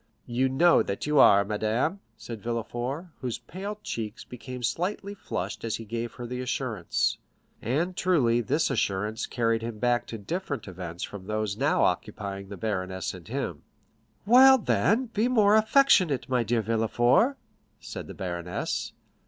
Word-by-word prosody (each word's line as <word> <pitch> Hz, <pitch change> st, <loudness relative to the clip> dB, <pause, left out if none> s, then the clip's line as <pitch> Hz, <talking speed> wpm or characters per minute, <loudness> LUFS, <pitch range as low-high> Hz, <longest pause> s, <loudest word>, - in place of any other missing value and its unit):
"You 125 Hz, +2 st, 0 dB
know 165 Hz, +6 st, +5 dB
that 100 Hz, -, -3 dB
you 150 Hz, -1 st, +3 dB
are, 100 Hz, -4 st, +7 dB
madame," 110 Hz, -, -1 dB, 0.2 s
said 115 Hz, -3 st, -8 dB
Villefort, 120 Hz, -, -3 dB
whose 125 Hz, -3 st, -3 dB
pale 200 Hz, +4 st, -7 dB
cheeks 110 Hz, -, -5 dB
became 125 Hz, 0 st, -8 dB
slightly 195 Hz, -, -2 dB
flushed 100 Hz, -, -5 dB
as 115 Hz, -1 st, -1 dB
he 115 Hz, -, -7 dB
gave 115 Hz, +1 st, -4 dB
her 120 Hz, -, -6 dB
the 125 Hz, +1 st, -4 dB
assurance. 120 Hz, -7 st, -1 dB, 0.4 s
And 160 Hz, -, -1 dB
truly 130 Hz, -12 st, +2 dB
this 145 Hz, +8 st, 0 dB
assurance 105 Hz, +2 st, -1 dB
carried 115 Hz, -1 st, 0 dB
him 115 Hz, -1 st, -5 dB
back 120 Hz, +1 st, +1 dB
to 115 Hz, -, -6 dB
different 150 Hz, -, -4 dB
events 90 Hz, -2 st, -6 dB
from 100 Hz, -2 st, -7 dB
those 110 Hz, -2 st, -1 dB
now 140 Hz, +7 st, +2 dB
occupying 100 Hz, +1 st, -2 dB
the 100 Hz, -, -7 dB
baroness 95 Hz, -2 st, -3 dB
and 90 Hz, -3 st, -11 dB
him. 115 Hz, -, -4 dB, 0.6 s
"Well, 260 Hz, +4 st, +8 dB
then, 200 Hz, -, +2 dB
be 215 Hz, +3 st, +2 dB
more 215 Hz, -4 st, +4 dB
affectionate, 220 Hz, -, +4 dB
my 125 Hz, -2 st, +1 dB
dear 115 Hz, 0 st, 0 dB
Villefort," 120 Hz, -, +2 dB, 0.4 s
said -, -, -7 dB
the -, -, -9 dB
baroness. 90 Hz, -1 st, -3 dB
120 Hz, 155 wpm, -27 LUFS, 105-160 Hz, 0.6 s, Well